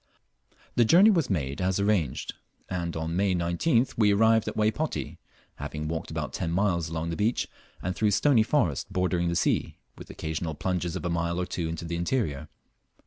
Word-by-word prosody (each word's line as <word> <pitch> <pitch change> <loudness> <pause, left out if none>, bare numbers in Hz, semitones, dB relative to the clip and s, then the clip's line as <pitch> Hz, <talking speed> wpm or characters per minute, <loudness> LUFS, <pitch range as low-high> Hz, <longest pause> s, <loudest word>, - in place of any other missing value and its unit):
The 120 - +6
journey 180 - +7
was 165 -8 +1
made 70 -5 -2
as 95 +1 +1
arranged, 100 - 0 0.3
and 85 -2 -3
on 80 +1 -3
May 95 0 +2
19th 90 - +1
we 105 -2 +5
arrived 110 +2 +4
at - - -4
Waypoti, 110 +9 -1 0.4
having 75 +1 -5
walked 80 0 -4
about 75 -2 -4
ten 85 - -2
miles 85 -3 +1
along 80 0 -3
the - - -2
beach, 110 +5 0 0.4
and 90 +1 -2
through 110 - +2
stony 110 +5 +4
forest 110 - 0
bordering 90 -1 0
the 85 - -1
sea, - - 0 0.2
with - - -11
occasional 80 0 -4
plunges 90 0 -2
of - - -4
a - - 0
mile 85 +1 -1
or 90 - 0
two 85 -2 -3
into 85 +1 -5
the 85 0 -3
interior. 85 - -1
90 Hz, 185 wpm, -27 LUFS, 80-105 Hz, 0.4 s, journey